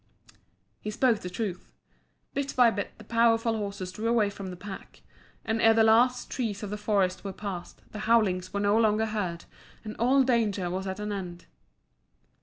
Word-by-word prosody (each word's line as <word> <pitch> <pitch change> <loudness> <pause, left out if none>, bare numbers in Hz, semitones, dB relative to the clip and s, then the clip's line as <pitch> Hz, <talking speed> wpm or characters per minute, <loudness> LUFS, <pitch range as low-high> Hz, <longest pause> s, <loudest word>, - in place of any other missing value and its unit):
He 210 - -5
spoke 235 0 +2
the 180 - -6
truth. 180 -2 -4 0.6
Bit 280 0 -3
by 245 -2 +6
bit 205 -2 -5
the - - -12
powerful 230 0 +2
horses 200 -3 -4
drew 215 +5 -4
away 225 -3 +2
from 200 -1 -7
the 180 - -6
pack, 190 +2 -10 0.4
and 225 +1 0
ere 225 0 +6
the 225 - +5
last 245 +3 +3
trees 220 -5 -3
of 205 - -5
the - - -2
forest 200 -3 0
were 200 - -4
passed, 190 -3 -7
the 210 - -7
howlings 210 -5 +2
were 200 - -2
no 205 +2 +3
longer 220 -1 +3
heard 195 -6 -3 0.4
and 215 -1 -7
all 260 +4 +4
danger 210 -8 +1
was 190 +1 -3
at 190 +1 -4
an 210 0 -3
end. 180 -3 -6
210 Hz, 185 wpm, -28 LUFS, 190-230 Hz, 0.6 s, by